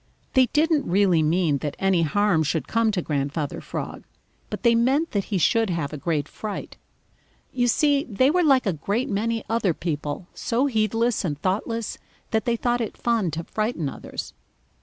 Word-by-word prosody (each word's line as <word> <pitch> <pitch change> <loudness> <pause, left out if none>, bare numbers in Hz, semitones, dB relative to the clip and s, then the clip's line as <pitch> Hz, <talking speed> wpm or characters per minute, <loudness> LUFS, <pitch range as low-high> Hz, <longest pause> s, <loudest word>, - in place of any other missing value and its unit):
They 260 -1 +5
didn't 305 - +1
really 185 -3 +4
mean 155 -2 +2
that 145 0 -4
any 195 -3 +2
harm 180 +1 +2
should 155 +1 -1
come 230 0 +2
to 190 -5 -1
Grandfather 145 0 -2
Frog, - - -6 0.5
but - - -6
they 235 -1 +5
meant 265 +8 +2
that 200 -2 -1
he 200 - -1
should 225 +5 +2
have 165 -4 -2
a - - -4
great 150 -1 -1
fright. 215 -2 -6 0.8
You 245 -1 +1
see, 285 +3 +3
they 260 +5 +2
were 360 +2 +3
like 270 -6 +4
a 195 - +1
great 200 - -2
many 225 +2 -1
other 215 -7 +1
people, 150 0 -3
so 245 +4 0
heedless 225 -2 +1
and 150 -5 -2
thoughtless 215 +6 -2 0.3
that 220 -2 +1
they 235 - +2
thought 240 +1 0
it 220 - -4
fun 230 -6 +1
to 165 - -3
frighten 215 - -2
others. - - -7
210 Hz, 180 wpm, -24 LUFS, 165-235 Hz, 0.8 s, They